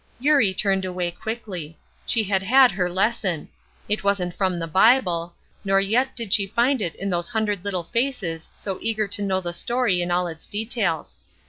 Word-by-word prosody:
Eurie 275 -7 +4
turned 195 -1 +2
away 180 -1 -2
quickly. 180 -6 -6 0.3
She 230 -2 +2
had 195 -2 0
had 255 +5 +6
her 180 -1 -1
lesson. 190 -3 -1 0.4
It 210 0 -1
wasn't 195 -3 0
from 185 -2 0
the 165 - -3
Bible, 175 -2 +3 0.3
nor 195 -1 +3
yet 225 +7 +1
did 230 -5 -2
she 200 -2 +3
find 240 +5 +1
it 170 -4 -3
in 195 +1 -4
those 175 +2 -1
hundred 215 -5 -1
little 190 -4 -2
faces 195 -7 -2
so 195 -2 -4
eager 220 -2 0
to 205 +1 -1
know 190 -2 0
the 175 -1 -3
story 235 -2 +1
in 175 - -2
all 180 +1 +1
its 160 -2 -8
details. 210 - -2
195 Hz, 185 wpm, -23 LUFS, 175-220 Hz, 0.4 s, had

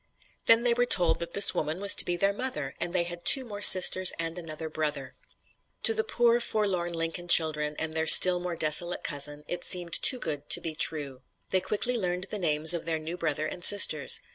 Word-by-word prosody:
Then 230 +1 +2
they 240 -1 0
were 245 +1 -4
told 175 -7 0
that 170 0 -10
this 200 - +5
woman 155 +4 -7
was 200 0 +5
to - - +2
be 175 0 -5
their 195 +3 -2
mother 200 - -6
and 175 - -5
they 180 -1 -3
had 175 0 -11
two 265 -2 +6
more 205 -3 -12
sisters 185 -1 +6
and 165 0 -6
another 160 -2 -10
brother! 150 -4 -7 0.7
To 450 - +2
the 445 0 -3
poor 240 - -2
forlorn 195 -7 -5
Lincoln 165 +1 -8
children 150 -3 +2
and 160 0 -5
their 160 0 -5
still 180 +1 +6
more 175 -1 -8
desolate 165 +3 +1
cousin, 145 0 -5
it 175 0 -8
seemed 175 -2 0
too 255 - +3
good 150 -9 -9
to - - +3
be 165 - -7
true. 145 -4 -4 0.3
They 185 - -3
quickly 240 +6 -4
learned 180 -1 -6
the 210 - -6
names 160 -1 +1
of 170 - -7
their 165 -1 -5
new 160 +2 -10
brother 155 -3 -6
and 175 +3 -10
sisters. 170 -8 +4
175 Hz, 215 wpm, -23 LUFS, 155-195 Hz, 0.7 s, two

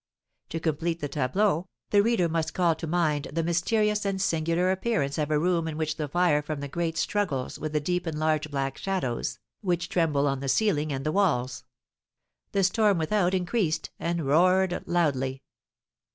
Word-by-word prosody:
To 165 - -3
complete 165 +1 -1
the 145 - -3
tableau, 155 +6 0 0.2
the 205 - +6
reader 215 -5 +2
must 165 -1 -2
call 175 -2 +3
to 160 +1 -6
mind 155 -3 0
the 165 +2 -1
mysterious 210 +5 +1
and 195 -1 -1
singular 170 0 +1
appearance 190 -8 -1
of 150 -1 0
a 155 - +2
room 170 +1 +1
in 155 -1 -4
which 155 -1 -1
the 150 - -2
fire 170 -1 +2
from 150 0 -4
the 140 - -4
grate 165 +3 -2
struggles 180 -12 -1
with 155 0 -3
the 150 - +2
deep 180 +3 -2
and 160 -2 -3
large 155 -1 0
black 135 -1 -3
shadows, 180 -12 -2 0.2
which 175 -3 -1
tremble 155 -6 +1
on 135 -1 0
the 135 0 -3
ceiling 155 -6 +1
and 135 -1 -3
the 155 - +1
walls. 130 -10 0 0.9
The 195 - +1
storm 205 +1 +3
without 180 +3 +1
increased, 180 -4 -1
and 170 -2 -1
roared 180 +5 +3
loudly. 135 -6 0
165 Hz, 180 wpm, -27 LUFS, 150-185 Hz, 0.9 s, the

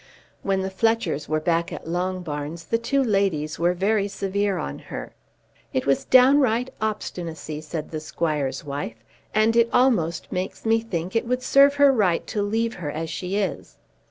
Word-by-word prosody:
When 195 -1 0
the 190 0 -3
Fletchers 225 -8 0
were 155 0 +1
back 170 +1 0
at - - -7
Longbarns, 170 -3 -3
the 230 - +2
two 270 +4 +1
ladies 195 - 0
were 175 +1 +2
very 200 +2 +1
severe 200 0 -1
on 70 +1 -4
her. - - -8 0.6
"It 130 - 0
was 135 -1 +1
downright 255 -2 +5
obstinacy," 170 -7 -4
said 155 0 -6
the 155 - -3
squire's 150 -4 -2
wife, 140 -5 -4 0.4
"and 220 +1 +3
it 235 0 +4
almost 210 -11 +2
makes 185 +4 -4
me 225 0 +4
think 185 -4 -4
it 225 +1 +1
would 250 +1 -1
serve 280 +1 +5
her 285 -1 +6
right 190 -8 +2
to 210 - -2
leave 225 +3 0
her 165 -5 -5
as 160 +2 -4
she 185 +3 -3
is." 205 -2 -3
190 Hz, 170 wpm, -24 LUFS, 160-225 Hz, 0.6 s, her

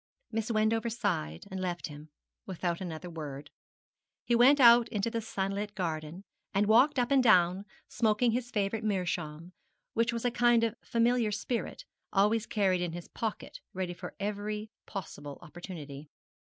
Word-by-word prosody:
Miss 225 0 -2
Wendover 225 +1 +1
sighed, 180 - -2
and 190 - -4
left 180 -2 -3
him, 150 0 -9 0.4
without 175 -1 -2
another 175 -1 -5
word. 150 -4 -7 0.7
He 240 - +1
went 255 +5 +6
out 235 -2 +7
into 210 +2 -1
the 230 -1 -2
sunlit 205 0 -3
garden, 165 -1 -4 0.3
and 200 +1 +3
walked 250 +8 +5
up 245 +1 +1
and 275 -1 +5
down 190 -4 +4 0.2
smoking 225 +1 +2
his 245 +1 -2
favourite 210 0 -1
meerschaum, 175 -4 -2 0.4
which 230 +1 +2
was 235 0 -4
a 245 - +2
kind 240 -1 +4
of 225 -2 +1
familiar 235 -1 +2
spirit, 235 - -3 0.3
always 210 +3 +2
carried 190 -4 +1
in 175 -2 -2
his 175 0 -8
pocket 220 -2 -5
ready 185 -1 -3
for 175 - -9
every 210 +1 -3 0.2
possible 145 -7 -7
opportunity. 155 -4 -9
205 Hz, 150 wpm, -30 LUFS, 175-230 Hz, 0.7 s, out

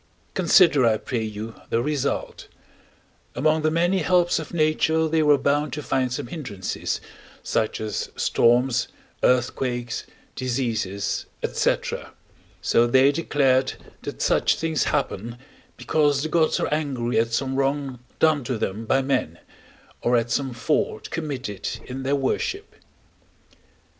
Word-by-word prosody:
Consider, 170 -6 +5
I 115 -2 +4
pray 120 +1 -3
you, 110 +1 -5 0.2
the 115 - +1
result: 145 +2 -2 0.9
among 155 +2 +2
the 155 - +2
many 175 +4 +2
helps 175 0 +2
of 160 - -7
nature 160 0 +2
they 160 0 +2
were 150 -1 +5
bound 145 0 0
to 150 - -4
find 130 -2 0
some 135 +2 -3
hindrances, 120 - -4 0.4
such 110 - -1
as 110 -1 -3
storms, 120 +1 +2 0.3
earthquakes, 125 -1 0 0.3
diseases, 115 -6 -2 0.2
&c.: - - +2 0.9
so 120 +1 +4
they 130 +3 +5
declared 135 -4 +2 0.3
that - - -5
such - - +3
things 160 -4 0
happen, 115 +4 -2 0.4
because 145 -2 +1
the 155 - -2
gods 160 -1 +2
are - - 0
angry 130 -7 0
at 115 +1 0
some 130 +3 -1
wrong 135 -1 -1 0.2
done 155 -3 +3
to 125 -1 -2
them 105 +2 -3
by 135 +3 +3
men, 130 - -1 0.6
or 120 0 +3
at 115 0 -1
some 135 +2 0
fault 125 +6 -1
committed 135 - -4
in 130 +1 -6
their 135 +2 +1
worship. 145 - -2
135 Hz, 135 wpm, -24 LUFS, 120-155 Hz, 0.9 s, Consider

